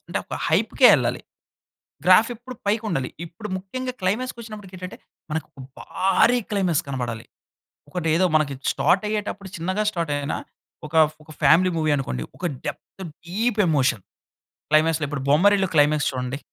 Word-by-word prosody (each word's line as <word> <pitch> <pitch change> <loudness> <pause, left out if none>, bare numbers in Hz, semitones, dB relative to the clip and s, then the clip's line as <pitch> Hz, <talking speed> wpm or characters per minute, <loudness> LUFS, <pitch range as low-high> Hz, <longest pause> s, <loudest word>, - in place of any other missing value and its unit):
అంటే, - - -1
ఒక - - -6
హైప్‌కే - - +4
వెళ్ళాలి. - - 0 0.9
గ్రాఫ్ 185 +6 +6
ఎప్పుడు 250 +3 -10
పైకుండాలి. 200 - -1 0.2
ఇప్పుడు 170 +6 -9
ముఖ్యంగా 255 +7 -5
క్లైమాక్స్‌ 215 +8 -1
కొచ్చినప్పటికేంటంటే, 195 -5 -9 0.3
మనకొక 155 -2 -5 0.2
భారీ 235 +6 +2
క్లైమాక్స్ 185 -6 +1
కనబడాలి. 120 -4 -4 0.6
ఒకటేదో 175 0 +1
మనకి 150 -2 +2 0.2
స్టార్ట్ 185 - +2
అయ్యేటప్పుడు 205 -2 -4
చిన్నగా 185 +5 -1
స్టార్ట్ 170 -6 -2
అయినా, 145 +1 -3 0.5
ఒక 150 - -18 0.3
ఒక 155 - -23
ఫ్యామిలీ 185 +3 +5
మూవీ 155 -1 +1
అనుకోండి, 65 - -3
ఒక 180 - -5 0.2
డెప్త్ 190 - -7 0.2
డీప్ 220 +5 -1
ఎమోషన్. 135 - +2 0.7
క్లైమాక్స్‌లో 155 0 +3
ఇప్పుడు 145 -3 -4
'బొమ్మరిల్లు' 190 +5 +4
క్లైమాక్స్ 150 0 +3
చూడండి. 125 +1 -4
180 Hz, 130 wpm, -23 LUFS, 150-205 Hz, 0.9 s, గ్రాఫ్